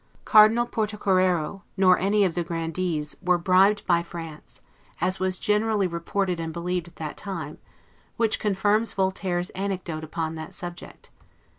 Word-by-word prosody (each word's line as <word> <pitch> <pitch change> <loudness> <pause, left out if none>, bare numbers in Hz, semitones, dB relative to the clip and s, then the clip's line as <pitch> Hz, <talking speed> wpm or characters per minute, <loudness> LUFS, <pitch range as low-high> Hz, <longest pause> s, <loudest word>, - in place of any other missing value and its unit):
Cardinal 220 +2 +6
Portocarrero, 195 -6 0 0.2
nor 185 -1 +5
any 200 +2 +3
of 180 - 0
the 175 - -1
Grandees, 165 -2 -2
were 180 -1 +3
bribed 190 +4 +3
by 170 -1 +3
France, 165 -2 -10 0.4
as 185 +3 0
was 185 0 +1
generally 210 0 +1
reported 180 +1 -2
and 165 0 -3
believed 175 +1 -3
at 170 - -15
that 155 -2 -6
time; 170 -7 -6 0.6
which 225 -2 +1
confirms 210 +2 +1
Voltaire's 190 -2 -1
anecdote 185 -5 -4
upon 160 0 -3
that 160 -1 -8
subject. 175 0 -9
185 Hz, 140 wpm, -25 LUFS, 170-200 Hz, 0.6 s, Cardinal